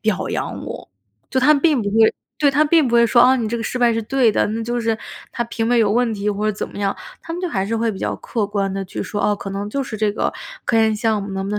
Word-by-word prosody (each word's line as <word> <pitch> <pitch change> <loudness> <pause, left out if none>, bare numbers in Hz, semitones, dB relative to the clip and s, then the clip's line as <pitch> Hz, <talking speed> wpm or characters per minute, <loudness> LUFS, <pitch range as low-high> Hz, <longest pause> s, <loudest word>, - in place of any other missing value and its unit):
表 215 -3 -1
扬 - - -4
我。 - - -8 0.4
就 260 - +1
他 295 +4 +6
并 295 -3 +2
不 205 - -2
会 220 +1 +4 0.2
对， 290 -2 +4
他 290 +3 +3
并 310 -1 +4
不 240 - -3
会 235 0 +6
说： 240 +1 +5
“啊， 255 +1 +5
你 230 -4 -2
这 235 - -2
个 225 - -4
失 250 - -3
败 240 -1 +4
是 225 - -1
对 250 0 +2
的， - - +1
那 225 +2 -3
就 240 +1 -2
是 225 -1 0 0.4
他 240 - -1
评 230 -1 -3
委 245 - +3
有 215 -3 +3
问 235 +1 +2
题”， 205 0 -2
或 205 0 -1
者 215 - +2
怎 205 - -5
么 - - -13
样。 200 -1 0 0.3
他 330 - -7
们 345 - -4
就 365 - -2
还 195 - -1
是 225 +3 -2
会 225 0 0
比 190 - -8
较 - - -2
客 220 -4 -2
观 200 -1 -1
地 195 0 -3
去 185 - -5
说： 205 - -4
“哦， 210 - +2
可 200 - -7
能 200 +1 -4
就 275 +5 -1
是 250 -5 -6
这 210 -1 +1
个 - - -1 0.4
科 235 - +2
研 220 -1 +3
项 215 -1 0
目 200 - -6
能 195 0 -3
不 200 - -4
能 210 - -1
225 Hz, 330 characters per minute, -20 LUFS, 205-245 Hz, 0.4 s, 他